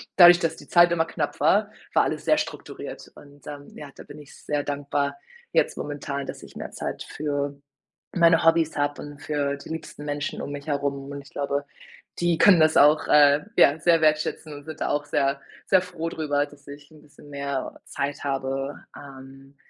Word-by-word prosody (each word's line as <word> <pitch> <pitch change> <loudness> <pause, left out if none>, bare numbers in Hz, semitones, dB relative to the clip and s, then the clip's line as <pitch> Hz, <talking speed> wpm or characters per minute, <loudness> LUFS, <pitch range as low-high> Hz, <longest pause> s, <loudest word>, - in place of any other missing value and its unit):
dadurch, 175 -1 +9
dass 165 -2 -1
die - - -14
Zeit 175 0 +5
immer 165 -1 +2
knapp 165 - -4
war, - - +3 0.2
war - - +4
alles - - -3
sehr - - +4
strukturiert. - - -7
Und, 145 -1 -17
ähm, 145 -1 -8
ja, 145 - -9
da - - -11
bin 145 - -12
ich 145 -2 -14
sehr 145 -1 -3
dankbar 140 0 -2 0.4
jetzt - - +2
momentan, 140 -1 -4
dass - - -8
ich - - -14
mehr - - -7
Zeit - - -5
für 145 -1 -3 0.6
meine 170 -2 +5
Hobbys 165 -1 +3
habe 145 0 -1
und 145 -1 -10
für 145 -2 -1
die 140 - -12
liebsten 160 -2 -7
Menschen 145 0 -3
um - - -5
mich 145 0 -7
herum 140 -1 -2
und 140 0 -6
ich 140 - -17
glaube, 140 0 -2 0.6
die 175 -1 +2
können 185 -2 +6
das 155 0 +4
auch, 150 +2 +5
äh, 145 0 +5
ja, 145 +3 +5
sehr 165 0 +3
wertschätzen 155 0 +1
und 145 0 -11
sind 155 -1 -9
da - - 0
auch 145 0 -1
sehr, 140 -1 0 0.3
sehr 190 -1 +5
froh 170 -2 -5
drüber, 145 -3 -1
dass 145 -1 -19
ich 145 +1 -12
‘n 155 -1 -17
bisschen 145 0 -18
mehr 140 -2 -4
Zeit 140 +1 -4
habe. 135 0 -2 0.2
Ähm, 135 0 -13
145 Hz, 195 wpm, -25 LUFS, 140-155 Hz, 0.6 s, dadurch